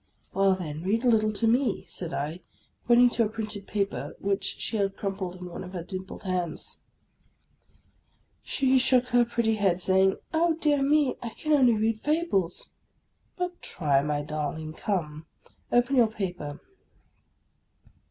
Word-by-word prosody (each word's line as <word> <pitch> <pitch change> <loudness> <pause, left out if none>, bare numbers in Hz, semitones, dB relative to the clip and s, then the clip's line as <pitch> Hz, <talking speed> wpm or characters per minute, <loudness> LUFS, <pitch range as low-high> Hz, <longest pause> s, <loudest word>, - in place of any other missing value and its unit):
" - - -34
Well, 195 -1 +3
then, 155 -4 -5
read 210 +7 0
a - - +5
little 215 -2 +3
to 225 +2 +1
me," 240 -1 +1
said 170 -3 -5
I, 155 +3 -3 0.5
pointing 240 0 +6
to 230 - +2
a - - -2
printed 215 -2 -5
paper 200 -1 -2
which 195 0 -1
she 225 - -3
held 195 -1 -1
crumpled 190 -2 -3
in 180 0 -9
one 175 - -7
of 180 - -10
her 175 -3 -4
dimpled 185 +1 -7
hands. 180 -4 -3 1.6
She 265 -1 +2
shook 250 -1 +2
her 245 0 +5
pretty 230 -2 0
head, 190 -4 +2
saying, 190 +1 +3
— - - -43
" - - -34
Oh, 330 0 +3
dear 290 -3 +2
me! 290 0 +3
I 235 - -4
can 305 +7 -4
only 255 -5 +5
read 220 0 0
fables." 295 - 0 0.3
" - - -44
But 360 -1 -3
try, 140 -5 +1
my 145 0 -1
darling, 155 +1 -4
come, 160 -5 -3 0.4
open 245 +3 +3
your 235 -2 +6
paper." 180 -9 -5
205 Hz, 165 wpm, -27 LUFS, 180-245 Hz, 1.6 s, pointing